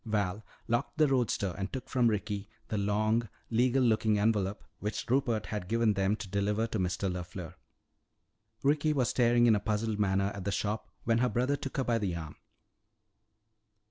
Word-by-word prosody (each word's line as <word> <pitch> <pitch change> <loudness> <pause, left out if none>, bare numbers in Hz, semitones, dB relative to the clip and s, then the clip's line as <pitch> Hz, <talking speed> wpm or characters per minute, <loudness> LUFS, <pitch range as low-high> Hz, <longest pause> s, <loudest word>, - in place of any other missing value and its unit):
Val 105 -2 -1 0.2
locked 120 +5 -1
the 155 -1 +5
roadster 120 -8 +1
and 95 +1 -3
took 130 -2 -5
from 125 -3 +2
Ricky 105 -1 -2 0.2
the 110 - -1
long 110 +3 +1 0.2
legal 125 +3 +3
looking 110 -2 +3
envelope 105 -2 +1 0.2
which 105 +1 -3
Rupert 120 -4 +1
had 105 -4 -4
given 115 0 +2
them 100 +1 +1
to 105 - -7
deliver 100 +3 0
to 115 -2 -3
Mr. 90 +2 -1
LeFleur. 90 -1 -5 1.1
Ricky 150 +2 +3
was 130 -4 +1
staring 120 -1 +4
in 115 -2 +6
a - - +1
puzzled 105 0 -1
manner 100 0 +2
at 100 - -6
the 100 - -1
shop 105 +2 -2
when 115 0 +2
her 125 +1 +2
brother 125 +6 +1
took 135 -1 -6
her 135 - +2
by 120 -2 +1
the 95 -5 -1
arm. 80 -3 -6
110 Hz, 175 wpm, -31 LUFS, 100-120 Hz, 1.1 s, in